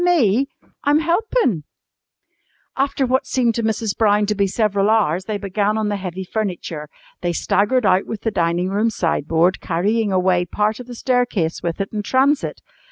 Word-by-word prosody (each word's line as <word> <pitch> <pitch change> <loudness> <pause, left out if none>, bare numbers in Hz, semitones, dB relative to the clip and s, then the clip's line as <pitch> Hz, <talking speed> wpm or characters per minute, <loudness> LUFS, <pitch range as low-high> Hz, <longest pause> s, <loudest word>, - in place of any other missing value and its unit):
"Me? 275 - +3 0.4
I'm 290 0 +4
helpin'!" 340 - +1 1.1
After 275 0 0
what 260 +1 0
seemed 240 -3 +1
to 230 - -2
Mrs. 220 -1 -1
Brown 210 -1 +3
to 210 - 0
be 200 -1 +1
several 205 0 +1
hours 190 -5 +2
they 215 0 -2
began 205 +1 -1
on 215 -1 0
the 205 - -1
heavy 190 -1 -5
furniture. 175 -7 -4 0.3
They 175 -1 -1
staggered 210 +8 +1
out 190 0 +3
with 220 - -5
the 225 - -1
dining 175 0 0
room 210 +4 +1
sideboard, 170 -2 +1
carrying 205 +5 0
away 180 -1 +2
part 210 +5 -1
of 250 - -9
the 245 - -8
staircase 240 -10 0
with 170 +1 -3
it 195 - -2
in 210 - -1
transit. 270 +7 +1
210 Hz, 170 wpm, -20 LUFS, 185-240 Hz, 1.1 s, I'm